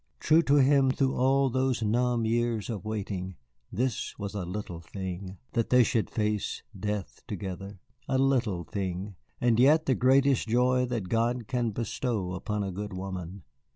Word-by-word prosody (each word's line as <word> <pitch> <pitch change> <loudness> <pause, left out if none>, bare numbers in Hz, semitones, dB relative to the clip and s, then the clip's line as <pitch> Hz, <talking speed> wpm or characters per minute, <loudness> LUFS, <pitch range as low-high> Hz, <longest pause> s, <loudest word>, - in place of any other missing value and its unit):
True 155 +2 +5
to 145 -3 +3
him 135 -1 +5
through 135 0 +1
all 135 +1 +3
those 130 -2 0
numb 120 +2 +1
years 115 -1 0
of 105 -4 -5
waiting, 95 -4 -4 0.4
this 120 +3 -2
was 100 0 -5
a 100 -4 -3
little 90 -2 -5
thing 95 +1 -6
that 115 -3 0
they 125 -1 +6
should 115 -1 0
face 105 -2 -1
death 105 0 -4
together. 95 +1 -6 0.3
A 130 - +1
little 125 -9 +1
thing, 95 +2 -4 0.3
and 120 -2 +3
yet 150 +5 +5
the 135 - +3
greatest 130 0 +3
joy 125 +2 +3
that 115 -6 -3
God 115 +2 0
can 120 -2 0
bestow 110 -3 -2
upon 105 +3 -2
a 95 - -3
good 105 +2 -5
woman. 95 -1 -6
110 Hz, 160 wpm, -28 LUFS, 100-125 Hz, 0.4 s, they